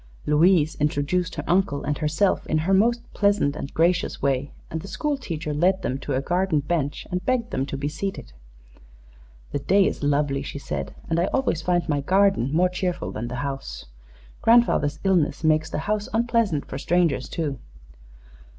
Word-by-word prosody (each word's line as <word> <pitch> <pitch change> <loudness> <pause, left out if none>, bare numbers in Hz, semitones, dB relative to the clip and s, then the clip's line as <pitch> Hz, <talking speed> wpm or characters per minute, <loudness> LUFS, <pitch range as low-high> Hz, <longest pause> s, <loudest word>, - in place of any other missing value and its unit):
Louise 160 +1 +4
introduced 150 +4 0
her 150 - -4
uncle 175 -6 +1
and 145 0 -2
herself 155 +6 +1
in 155 - +1
her 165 +5 +1
most 235 +5 +3
pleasant 200 -8 +2
and 145 -2 -6
gracious 170 +1 +1
way, 140 0 0 0.2
and 160 - -3
the 195 - -9
school 295 - -1
teacher 155 - -4
led 185 +6 +2
them 130 +2 -2
to 140 -1 -3
a 130 - 0
garden 175 -1 +1
bench 145 -1 -2
and 180 0 -2
begged 240 +1 0
them 135 +1 -1
to 140 - -4
be 140 +1 -2
seated. 155 - -5 1.2
"The 145 - -1
day 195 +7 +3
is - - -2
lovely," 145 -1 +1
she 140 - -6
said, 70 - -5
"and 165 0 0
I 175 - +3
always 250 -9 0
find 175 0 0
my 145 -3 0
garden 195 -4 +3
more 175 +4 +3
cheerful 180 -1 -3
than 110 +2 -4
the 125 - -5
house. 135 - -5 0.6
Grandfather's 225 -11 +4
illness 180 -5 +1
makes 155 0 +2
the - - -3
house 210 0 -1
unpleasant 230 -9 +1
for 135 - -6
strangers, 165 -5 +1
too." 145 -6 -3
160 Hz, 180 wpm, -24 LUFS, 145-190 Hz, 1.2 s, Louise